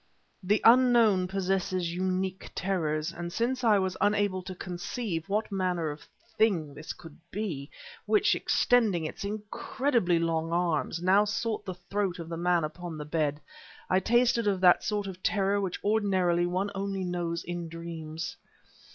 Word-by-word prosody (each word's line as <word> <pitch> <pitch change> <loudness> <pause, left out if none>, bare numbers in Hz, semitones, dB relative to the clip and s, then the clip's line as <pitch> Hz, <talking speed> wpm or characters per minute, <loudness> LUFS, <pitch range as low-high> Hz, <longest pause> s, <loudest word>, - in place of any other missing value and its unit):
The 205 +3 +1
unknown 230 -6 +6
possesses 185 -2 -1
unique 185 +1 -2
terrors; 160 -4 -1
and 170 0 -5
since 250 +6 -1
I 220 -3 +5
was 190 -1 -1
unable 205 -2 +2
to 185 0 -7
conceive 180 0 -4
what 210 +2 -1
manner 180 -5 0
of 145 - -11 0.3
thing 175 -10 +2
this 150 +2 -7
could 165 -4 -11
be, 165 -10 -4 0.4
which, 420 0 +4
extending 215 -9 +2
its 155 - -6
incredibly 210 0 0
long 165 -1 0
arms, 170 -1 0
now 190 +3 +5
sought 210 0 -2
the 185 -2 -5
throat 190 +1 -2
of 165 -2 -7
the 170 - -3
man 175 -1 +2
upon 165 +1 -5
the 150 - -6
bed, 150 -1 -1 0.5
I 185 - +5
tasted 235 +1 +2
of 195 -2 +1
that 180 -1 +6
sort 210 -1 -1
of 185 -1 -7
terror 200 0 +1
which 190 -3 -3
ordinarily 190 -5 +2
one 185 +3 -1
knows - - -13
only 180 -4 -2
in 175 -1 -4
dreams. 165 -1 -6
185 Hz, 155 wpm, -29 LUFS, 170-205 Hz, 0.5 s, unknown